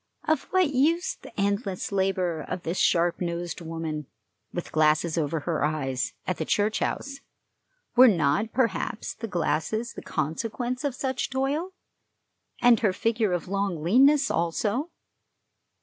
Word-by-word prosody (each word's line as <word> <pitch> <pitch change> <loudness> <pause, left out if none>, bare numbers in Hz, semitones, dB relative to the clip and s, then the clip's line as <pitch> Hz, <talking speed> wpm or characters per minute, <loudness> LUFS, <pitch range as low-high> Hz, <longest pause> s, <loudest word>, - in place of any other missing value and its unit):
Of 315 0 +1
what 370 -6 +2
use 335 - +2
the - - -10
endless 200 -1 -1
labor 185 -4 0
of 175 - -5
this 170 +3 -2
sharp 170 +1 +2
nosed 170 0 -3
woman, 160 -3 -4 0.4
with 175 - -5
glasses 155 +1 +3
over 160 -1 -1
her 160 +1 -1
eyes, 135 -4 -1
at 180 - -1
the - - -1
church 210 +5 +1
house? 275 0 -3 0.8
Were 255 +1 +9
not, 170 +2 +2
perhaps, 225 -4 -1
the 225 - -6
glasses 210 +5 -1
the - - -8
consequence 230 - -3
of 280 -4 -1
such 260 -1 -2
toil? 280 +7 -1 0.9
And 240 -2 +6
her 205 -5 +2
figure 225 -1 0
of 175 0 -2
a - - -9
long 195 -5 -1
leanness 270 - +5
also? 205 - 0
195 Hz, 145 wpm, -26 LUFS, 165-250 Hz, 0.9 s, Were